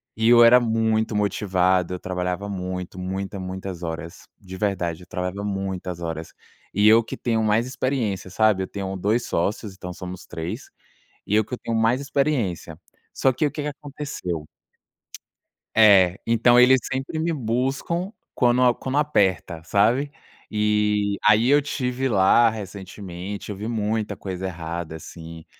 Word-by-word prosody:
E 110 +1 +2
eu 120 -1 +8
era 125 +2 +7
muito 110 -1 +1
motivado, 95 -3 +1
eu 90 - -4
trabalhava 90 +1 -3
muito, 90 -1 -5
muita, 95 +2 -4
muitas 95 -1 -6
horas, 85 +1 -6 0.2
de 95 -2 -10
verdade, 90 -4 -2
eu - - -17
trabalhava 90 +3 -4
muitas 95 -3 -4
horas. 80 -1 -5 0.4
E 105 +2 +4
eu 115 +2 +7
que - - -7
tenho 115 -2 0
mais 110 +3 +2
experiência, 130 -8 -2
sabe. 105 0 +2
Eu - - -5
tenho 95 -1 -5
2 105 +6 0
sócios, 100 +4 -2
então 90 -1 -8
somos 90 0 -8
3, 80 +1 -6 0.6
e 105 - +1
eu 110 - +3
que 125 - -5
tenho 115 -1 -3
mais 115 +4 +2
experiência. 135 - -1 0.4
Só 135 - +2
que 150 +5 0
o 145 - -2
que 150 - -4
que 150 - -3
aconteceu 140 - -6 1.3
É, 100 -4 +6
então 115 +1 +4
eles 130 +1 +7
sempre 135 +4 -3
me 165 +1 0
buscam 135 - -1 0.2
quando 125 0 +4
quando 135 +2 -3
aperta, 95 - +1
sabe? 115 - +2 0.4
E 105 -1 +1
aí 110 +3 +5
eu 145 +1 +6
estive 135 -2 -2
lá 110 +3 +5
recentemente, 100 -2 -7
eu - - -5
vi 105 +3 -5
muita 110 -1 -1
coisa 95 -1 -5
errada 85 -2 -5
assim, 80 0 -10
105 Hz, 150 wpm, -23 LUFS, 90-120 Hz, 1.3 s, eu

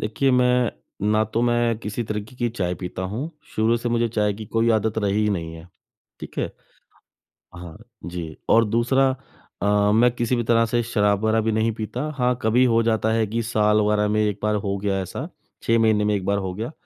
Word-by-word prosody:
देखिए, 120 +6 0
मैं 125 -1 +3 0.4
ना 110 0 +3
तो 115 +2 -2
मैं 120 -2 +1
किसी 110 +1 -4
तरीके 105 +3 -5
की 120 -1 0
चाय 90 -6 -2
पीता 90 0 -6
हूँ, 115 - -4 0.3
शुरू 110 +2 +3
से 120 +1 -3
मुझे 120 0 +1
चाय 105 -2 0
की 110 0 -8
कोई 115 +2 +1
आदत 110 0 +1
रही 105 0 +1
ही 105 - +1
नहीं 80 -4 -3
है। 80 +2 -12 0.5
ठीक - - -9
है? - - -2 1.0
हाँ 85 -1 -10 0.3
जी, 85 -3 -6
और 115 0 +5
दूसरा 125 +5 +2 0.5
अ, 105 0 +3
मैं 120 +3 +5
किसी 120 +1 0
भी 120 - -1
तरह 115 0 +3
से 120 +2 0
शराब 105 -3 +1
वगैरह 110 0 +2
भी 110 - 0
नहीं 110 +1 +1
पीता 110 +3 -4 0.2
हाँ, 125 -1 +1
कभी 115 +3 +3
हो 115 -1 +3
जाता 110 -1 +1
है 115 -1 +2
कि 115 +3 -2
साल 105 -1 +2
वगैरह 105 0 +2
में 110 0 +1
1 105 -1 -1
बार 105 0 +1
हो 100 -1 -2
गया 100 -1 -1
ऐसा, 95 - -6 0.4
6 115 0 +2
महीने 110 -2 +3
में 105 - +2
1 95 - -3
बार 100 +1 +1
हो 95 -2 -3
गया 115 +8 -5
110 Hz, 215 wpm, -23 LUFS, 105-115 Hz, 1.0 s, और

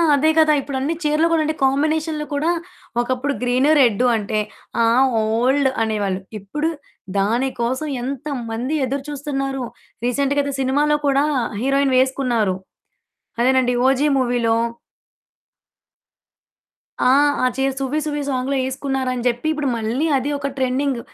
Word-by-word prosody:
అదే 295 +3 +3
కదా! 310 -1 +5
ఇప్పుడన్ని 275 +2 -2
చీరెలు 300 +2 +2
కూడా 325 -1 +3
అండి 310 +1 0
కాంబినేషన్‌లు 305 +3 +1
కూడా, 300 +4 +1 0.5
ఒకప్పుడు 255 +3 -1
గ్రీన్, 250 +3 +2
రెడ్ 245 -3 +4
అంటే, 215 0 -1 0.4
ఆ! - - +5 0.4
ఓల్డ్ 250 +6 +2
అనేవాళ్ళు. 205 -4 -1 0.2
ఇప్పుడు, 295 +11 -2 0.5
దాని 230 +7 +1
కోసం 260 +6 -1 0.2
ఎంతమంది 260 -1 -3
ఎదురు 270 +2 -3
చూస్తున్నారో! 275 -2 -3 0.4
రీసెంట్‌గా 280 +3 +1
ఐతే 280 - -3
సినిమాలో 290 +3 +2
కూడా 275 0 +3 0.4
హీరోయిన్ 275 +1 +2
వేసుకున్నారు. 250 -6 +1 0.9
అదేనండి. 255 0 +3
'ఓజీ' 275 +3 +2
మూవీలో. 240 -3 +1 2.5
ఆ! - - +6 0.4
ఆ - - +4
చీర 270 +1 +1
'సువ్వి 275 +3 -1
సువ్వి' 295 -1 -2
సాంగ్‌లో 265 +1 -1
ఏసుకున్నారని 265 -2 -2
జెప్పి. 240 +5 -1
ఇప్పుడు 300 -3 -1
మళ్ళీ 230 +7 -1
అది 265 +2 -2
ఒక 280 0 -3
ట్రెండింగ్. 260 0 0
270 Hz, 120 wpm, -20 LUFS, 245-285 Hz, 2.5 s, ఆ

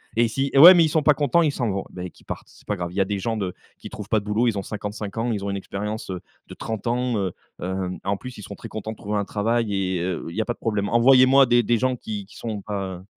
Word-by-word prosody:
et 115 0 +4
si: 135 +4 -2
«Mais 135 - +5
ouais, 175 +5 +12
mais 170 - +6
ils - - 0
sont 155 - +2
pas 150 -1 +4
contents, 145 +4 +2
ils 155 - +2
s'en 120 -7 -1
vont», 95 0 -3
mais 90 -1 -7
qu'ils - - -22
partent, - - -6
c'est - - -20
pas 105 - 0
grave. 85 -2 -4
Il 90 - -12
y 100 - +2
a 95 - +3
des 100 0 -2
gens 115 +4 -2
de 95 -4 -3 0.2
qui - - -9
trouvent - - -8
pas 110 - +3
de 100 - -12
boulot 105 +4 +1
ils 105 -3 0
ont - - -2
55 105 +1 -6
ans, 115 +2 0
ils 100 -3 -2
ont 100 - -2
une 100 - -2
expérience, 105 +1 -5
heu, 90 - -5 0.3
de - - -10
30 110 -3 -5
ans, 120 0 0
heu, 95 -3 -1 0.3
heu, 95 0 -2
en 100 +1 0
plus, 125 +4 -9
ils 105 - -9
sont - - -8
très - - -9
contents 110 0 -5
de 110 - -9
trouver 105 +1 -3
un 100 - -1
travail 110 0 0
et 95 -2 -1
heu, 90 0 -2
où - - -5
il 85 - -9
y 110 - +1
a - - -2
pas 120 - -1
de - - -24
problème. 105 -3 -1
Envoyez-moi 130 +3 +6
des 120 0 +4
des 120 +1 +2
gens 130 +1 +1
qui 105 -4 -6
qui - - -17
sont 110 -4 -4
pas 95 -3 -5
105 Hz, 320 wpm, -23 LUFS, 100-120 Hz, 0.3 s, ouais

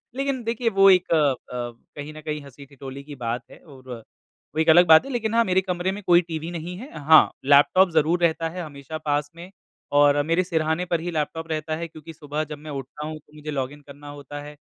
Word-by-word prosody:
लेकिन 270 -2 -2
देखिए 230 +1 -1
वो 195 0 +8
एक 185 -2 +4
अ - - +5
अ, 145 -3 +3 0.6
कहीं 145 +1 -7
न 155 - -10
कहीं 150 -1 -4
हँसी-ठिठोली 140 0 -11
की 145 0 -10
बात 120 -1 -3
है - - -14
और 135 -4 -16 0.7
वो - - -1
एक 160 +1 +2
अलग 175 +3 +7
बात 160 +5 +7
है, 275 - -7
लेकिन 225 -3 -2
हाँ 230 0 +4
मेरे 185 -1 +2
कमरे 180 0 -2
में 200 +2 -6
कोई 175 -1 +5
टीवी 165 -1 -6
नहीं 175 +1 -6
है 255 +9 -10
हाँ, 155 +2 +6
लैपटॉप 145 +7 +5
ज़रूर 160 +2 +2
रहता 165 0 +1
है 180 +2 -6
हमेशा 145 0 -8
पास 145 -1 -1
में 170 +2 -10 0.5
और 145 0 +5
मेरे 165 +3 +2
सिरहाने 160 -1 -1
पर 170 -2 -1
ही 175 +1 -4
लैपटॉप 160 +1 -3
रहता 155 0 -2
है, 165 +1 -5
क्योंकि 160 0 -12
सुबह 150 0 -4
जब 150 -1 -8
मैं 150 +1 -10
उठता 140 +2 -7
हूँ 155 0 -6
तो 150 - -28
मुझे 150 0 -7
लॉगिन 140 +1 -4
करना 145 +1 -13
होता 145 +1 -8
है, 150 +1 -10
155 Hz, 230 wpm, -24 LUFS, 145-175 Hz, 0.7 s, वो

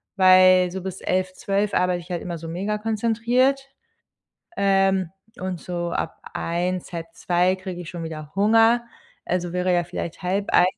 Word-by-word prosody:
weil 185 -1 +6
so 190 +1 -5
bis 190 0 -6
11, 185 0 -1
12 200 +2 -1
arbeite 180 -1 +1
ich 175 - -12
halt 175 - -2
immer 175 -1 -4
so 165 - -8
mega 195 +5 -2
konzentriert. 235 +5 +1 0.9
Ähm, 195 -2 +2 0.3
und 185 -2 -4
so 175 -1 -4
ab - - -3 0.2
1, 175 +2 -2
1:30 175 +2 0
kriege 185 -1 -7
ich 165 - -10
schon 170 -2 -6
wieder 155 -2 -7
Hunger, 225 +4 +4 0.4
also 175 -1 -2
wäre 180 0 +1
ja 175 0 +2
vielleicht 170 +1 -6
12:30 190 0 +2
185 Hz, 155 wpm, -23 LUFS, 175-200 Hz, 0.9 s, weil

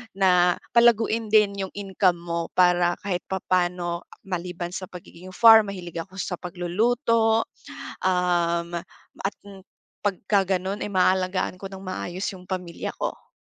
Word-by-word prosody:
na 180 -2 +4 0.2
palaguin 230 -1 +4
din 210 -2 +4
yung - - -17
income 190 -3 +1
mo 170 -1 -3
para 175 -1 +4
kahit 185 -3 -2
papaano, 175 -2 -1 0.2
maliban 175 -1 -4
sa - - -4
pagiging 180 0 -12
farm, 225 -2 +8
mahilig 175 -3 -7
ako 190 +2 -19
sa 185 - -2
pagluluto, 225 +6 +1 0.6
um, 175 -2 +1 0.5
at 195 - -1 0.7
pagka 195 -1 +1
gano'n, 190 +3 -4
eh, - - -3
maaalagaan 185 0 +1
ko 195 - -6
ng 195 -1 -9
maayos 185 0 -4
yung 180 -1 -13
pamilya 180 -3 -4
ko. - - -5
185 Hz, 130 wpm, -25 LUFS, 175-200 Hz, 0.7 s, farm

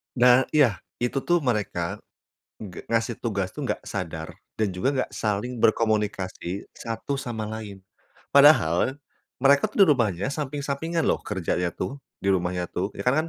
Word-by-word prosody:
Da 125 +1 +6
iya, 145 -9 +4 0.2
itu 125 +3 -1
tuh 175 0 +3
mereka 120 -8 -1 0.6
nggak 95 -5 -10
ngasih 115 0 0
tugas 100 -5 -2
tuh 145 -4 -5
enggak - - -3
sadar 80 -5 -5 0.2
dan 105 -4 0
juga 90 +8 -1
enggak 130 - -1
saling 110 +3 -2
berkomunikasi 105 -4 0
satu 115 +4 -4
sama 115 -4 -4
lain. 105 -3 -7 0.5
Padahal 135 - +5 0.4
mereka 140 +9 +4
tuh 205 -1 +5
di - - -2
rumahnya 105 -6 0
samping-sampingan 150 +3 -2
loh - - +1
kerjanya 90 -2 -1
tuh, 140 +1 -5 0.2
di 100 - +1
rumahnya 90 -1 0
tuh. 95 +2 -1
Ya - - -5
karena 155 +6 +2
115 Hz, 150 wpm, -25 LUFS, 100-140 Hz, 0.6 s, Da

